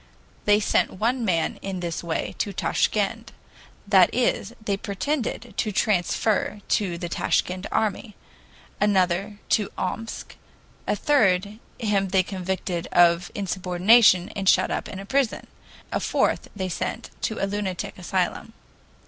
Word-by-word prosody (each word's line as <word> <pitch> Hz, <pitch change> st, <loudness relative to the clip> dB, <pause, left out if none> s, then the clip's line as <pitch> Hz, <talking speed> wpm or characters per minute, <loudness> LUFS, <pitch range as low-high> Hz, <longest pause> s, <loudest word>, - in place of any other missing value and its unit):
They 205 Hz, 0 st, +5 dB
sent 205 Hz, -, +1 dB
one 240 Hz, +3 st, +1 dB
man 170 Hz, -6 st, 0 dB
in 195 Hz, -2 st, -4 dB
this 170 Hz, -1 st, -4 dB
way 165 Hz, -1 st, -2 dB
to 205 Hz, -, -1 dB
Tashkend 215 Hz, +3 st, 0 dB, 0.6 s
that 190 Hz, -3 st, +6 dB
is, 235 Hz, -4 st, 0 dB
they 210 Hz, -3 st, -1 dB
pretended 230 Hz, +3 st, -3 dB
to 215 Hz, -, 0 dB
transfer 210 Hz, +1 st, +1 dB
to 185 Hz, -5 st, +1 dB
the 175 Hz, -, -4 dB
Tashkend 185 Hz, +2 st, -1 dB
army; 215 Hz, 0 st, -1 dB, 0.6 s
another 200 Hz, 0 st, +1 dB
to 210 Hz, -2 st, +2 dB
Omsk; 225 Hz, +5 st, -5 dB, 0.5 s
a -, -, +1 dB
third 210 Hz, -7 st, +2 dB, 0.2 s
him 205 Hz, -4 st, +1 dB
they 190 Hz, 0 st, +2 dB
convicted 185 Hz, -2 st, -3 dB
of 170 Hz, 0 st, +4 dB
insubordination 185 Hz, +1 st, +4 dB
and 195 Hz, -2 st, 0 dB
shut -, -, +4 dB
up -, -, -3 dB
in 195 Hz, 0 st, -7 dB
prison; 265 Hz, +1 st, 0 dB, 0.5 s
a -, -, 0 dB
fourth -, -, 0 dB
they 190 Hz, -2 st, -2 dB
sent 180 Hz, -, -4 dB
to 220 Hz, -, -2 dB
a -, -, 0 dB
lunatic 195 Hz, -3 st, -4 dB
asylum. 185 Hz, +4 st, -2 dB
195 Hz, 130 wpm, -24 LUFS, 180-215 Hz, 0.6 s, that